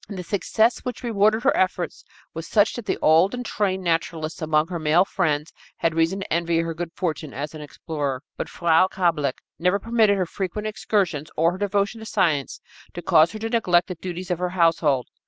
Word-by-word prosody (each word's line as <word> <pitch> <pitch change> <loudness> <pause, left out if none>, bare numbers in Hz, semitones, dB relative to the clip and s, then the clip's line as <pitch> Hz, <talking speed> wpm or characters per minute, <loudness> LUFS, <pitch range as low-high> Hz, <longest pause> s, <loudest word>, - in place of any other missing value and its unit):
And 200 - -6
the 180 - -5
success 220 +5 +1
which 250 0 -6
rewarded 220 0 +2
her 275 - +3
efforts 185 -1 -1 0.3
was 165 0 -6
such 210 0 +3
that 240 -3 -7
the - - 0
old 165 +8 +4
and 245 0 -5
trained 190 -4 -1
naturalists 165 -1 -2
among 155 +1 +1
her 175 -2 -3
male 160 +4 +3
friends 155 -6 -1 0.2
had 165 - 0
reason 165 +4 +1
to 190 - -4
envy 170 0 +1
her 165 0 -1
good 170 0 -5
fortune 155 - -3
as 145 +3 -5
an 155 - -8
explorer. 145 -2 -4
But - - -5
Frau 170 +1 +3
Kablick 165 -8 -1 0.2
never 180 +3 +2
permitted 220 -1 +2
her 185 - 0
frequent 195 +4 -4
excursions, 185 -8 -1
or 165 +2 +3
her 185 - -7
devotion 205 +2 0
to 220 - -9
science, 150 -10 0 0.3
to 175 - -6
cause 160 +1 +4
her - - -5
to 225 +1 -4
neglect 185 -6 +2
the - - -2
duties 180 +1 -6
of 175 - -1
her 180 0 -1
household. 165 -7 +2
175 Hz, 205 wpm, -23 LUFS, 160-200 Hz, 0.3 s, old